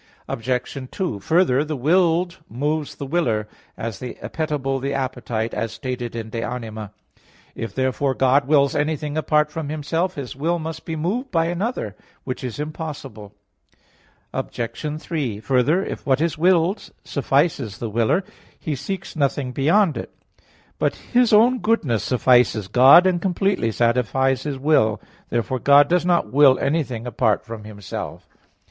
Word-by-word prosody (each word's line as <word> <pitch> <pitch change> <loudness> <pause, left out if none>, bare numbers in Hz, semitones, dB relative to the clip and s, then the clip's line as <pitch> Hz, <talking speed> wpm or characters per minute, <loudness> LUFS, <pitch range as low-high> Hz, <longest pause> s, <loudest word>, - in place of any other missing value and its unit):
Obj. 125 +2 -3
2: 180 - -3
Further, 145 - +2
the 155 0 -4
willed 170 +5 +2
moves 145 +6 -2
the 140 - -6
willer, 120 -9 0 0.3
as 110 -3 -5
the 125 -1 -6
appetible 145 -4 -3
the 140 +1 -2
appetite, 125 -4 -3
as 110 +1 -2
stated 125 -3 -5
in 110 -1 -5
De 115 - -3
Anima 110 -4 -5
iii, 105 - -39 0.3
54. - - -9
If, 100 - -10
therefore, 130 +1 0
God 135 +1 +3
wills 140 -2 +3
anything 150 0 -1
apart 150 -1 +2
from 155 -2 -4
Himself, 165 +5 -1
His 135 -5 -6
will 165 +6 0
must 160 0 -6
be 160 - -3
moved 205 - -2
by 165 -5 +1
another; 175 - -2 0.3
which 130 -1 -5
is 125 +1 -5
impossible. 145 -9 -7 1.0
Obj. 150 +6 -4
3: 140 -12 -3
Further, 135 - +2
if - - -6
what 135 -1 +2
is 160 -1 0
willed 180 +4 +2
suffices 135 - 0
the 115 -2 -5
willer, 115 - +2 0.4
he 155 - -3
seeks 190 +7 -5
nothing 140 -3 0
beyond 160 +6 +2
it. - - -5 0.7
But - - +1
His 245 -2 +1
own 240 +4 +5
goodness 145 - +1
suffices 125 -5 +3
God, 130 - +7
and 180 -2 +2
completely 190 - 0
satisfies 125 +3 +1
His 145 -2 -4
will. 130 -7 +2 0.3
Therefore 120 +2 -1
God 140 +2 +6
does 175 +1 +1
not 175 -7 +1
will 140 -2 +6
anything 135 -6 -1
apart 110 -3 0
from 110 -1 -8
Himself. 100 -3 -7
140 Hz, 155 wpm, -22 LUFS, 120-165 Hz, 1.0 s, God